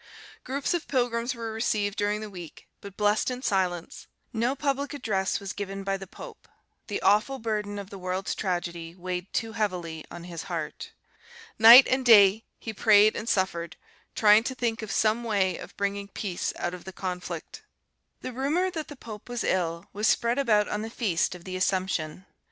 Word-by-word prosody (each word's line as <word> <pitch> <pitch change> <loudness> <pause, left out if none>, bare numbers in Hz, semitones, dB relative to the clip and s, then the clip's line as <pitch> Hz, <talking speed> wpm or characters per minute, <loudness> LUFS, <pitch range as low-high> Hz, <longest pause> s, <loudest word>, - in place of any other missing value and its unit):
Groups 275 +6 -2
of 345 -2 -2
pilgrims 245 -1 0
were 230 -1 -5
received 210 -3 0
during 205 +1 0
the 215 - -6
week, 175 -4 -10
but 200 -1 -11
blessed 210 +2 +2
in 250 0 -5
silence; 180 -6 -1 0.3
no 235 +4 0
public 280 0 -1
address 195 -8 -1
was 195 -1 -6
given 195 -1 -5
by 195 0 0
the 195 0 -7
pope: - - -12 0.4
the 205 - -2
awful 215 +7 +3
burden 210 -3 -3
of 200 -1 -7
the 195 - -8
world's 185 +1 -2
tragedy 175 -3 -3
weighed 180 +1 -5
too 225 0 -2
heavily 180 -7 -3
on 170 - -9
his 170 -2 -6
heart. - - -5 0.7
Night 235 +4 +11
and 260 0 +1
day 215 -3 +7
he 225 - -6
prayed 215 0 +5
and 225 - -4
suffered, 170 -3 0 0.4
trying 215 0 +6
to 260 - -3
think 230 -3 -1
of 220 - -6
some 220 +2 +2
way 200 -5 +1
of - - -11
bringing 200 0 -2
peace 195 -3 -3
out 175 - -3
of 180 - -8
the 190 - -8
conflict. 180 -1 -5 0.6
The 255 - -6
rumour 305 +9 0
that 320 -4 -5
the 290 - -9
pope 220 -4 -10
was 245 -1 -3
ill 170 -2 -1
was 210 +2 0
spread 235 +3 +2
about 215 -6 +3
on 210 - -2
the 220 - -5
feast 190 -7 0
of 175 - -12
the 185 0 -6
Assumption. 185 -2 -1
205 Hz, 185 wpm, -27 LUFS, 185-230 Hz, 0.7 s, Night